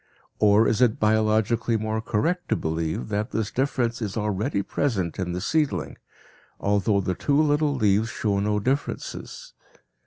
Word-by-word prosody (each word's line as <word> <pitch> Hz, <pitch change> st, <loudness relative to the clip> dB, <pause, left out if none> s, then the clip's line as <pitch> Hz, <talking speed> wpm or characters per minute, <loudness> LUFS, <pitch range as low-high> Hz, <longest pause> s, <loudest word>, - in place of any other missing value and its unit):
Or 105 Hz, +1 st, +5 dB
is 115 Hz, -, +1 dB
it 120 Hz, -3 st, +3 dB
biologically 110 Hz, +1 st, +2 dB
more 110 Hz, +1 st, -2 dB
correct 165 Hz, +13 st, -1 dB
to -, -, +3 dB
believe 80 Hz, -5 st, -2 dB
that 105 Hz, +3 st, -1 dB
this 110 Hz, -3 st, -2 dB
difference 125 Hz, -3 st, -1 dB
is 105 Hz, -2 st, -3 dB
already 105 Hz, +1 st, -1 dB
present 95 Hz, -, -2 dB
in 90 Hz, -2 st, -2 dB
the 90 Hz, -, -3 dB
seedling, 100 Hz, -, 0 dB, 0.6 s
although 100 Hz, 0 st, +1 dB
the 95 Hz, -, -1 dB
two 140 Hz, +9 st, +1 dB
little 150 Hz, -1 st, +2 dB
leaves 110 Hz, -2 st, +2 dB
show 100 Hz, -4 st, -1 dB
no 105 Hz, +1 st, 0 dB
differences? 135 Hz, +7 st, -4 dB
110 Hz, 150 wpm, -25 LUFS, 100-120 Hz, 0.6 s, Or